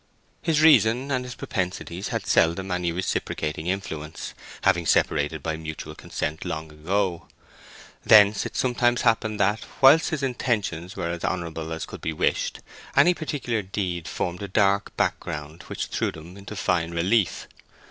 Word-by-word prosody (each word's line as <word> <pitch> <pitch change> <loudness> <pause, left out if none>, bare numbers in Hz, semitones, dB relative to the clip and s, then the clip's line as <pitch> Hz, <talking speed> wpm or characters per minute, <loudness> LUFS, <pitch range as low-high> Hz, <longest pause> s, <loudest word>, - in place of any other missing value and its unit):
His 160 -3 +2
reason 135 -3 +5
and 130 -1 0
his 125 -1 -7
propensities 95 -2 -3
had - - -3
seldom 90 +4 +2
any 90 -1 0
reciprocating 80 -2 -2
influence, 80 -5 -4 0.3
having 85 -1 +3
separated 75 0 +1
by 80 -1 -2
mutual 80 -1 -7
consent 75 +1 -4
long 80 0 -5
ago: 85 +2 -1 0.8
thence 105 -1 +6
it - - -6
sometimes 120 -1 +2
happened 110 -2 +1
that, 105 +2 +2 0.2
while 135 +4 +8
his 155 -3 -2
intentions 105 -9 -1
were 85 0 -2
as 85 -1 -5
honourable 80 -3 -3
as 80 0 -3
could - - -10
be 80 - -2
wished, - - 0 0.3
any 180 - +6
particular 140 -9 -2
deed 90 -3 -3
formed 90 +1 -3
a 100 - -4
dark 100 +1 +1
background 75 +2 -2
which - - -3
threw - - -1
them 80 +3 -11
into 100 +2 -9
fine 85 -4 0
relief. 90 +4 +1
95 Hz, 150 wpm, -25 LUFS, 80-110 Hz, 0.8 s, while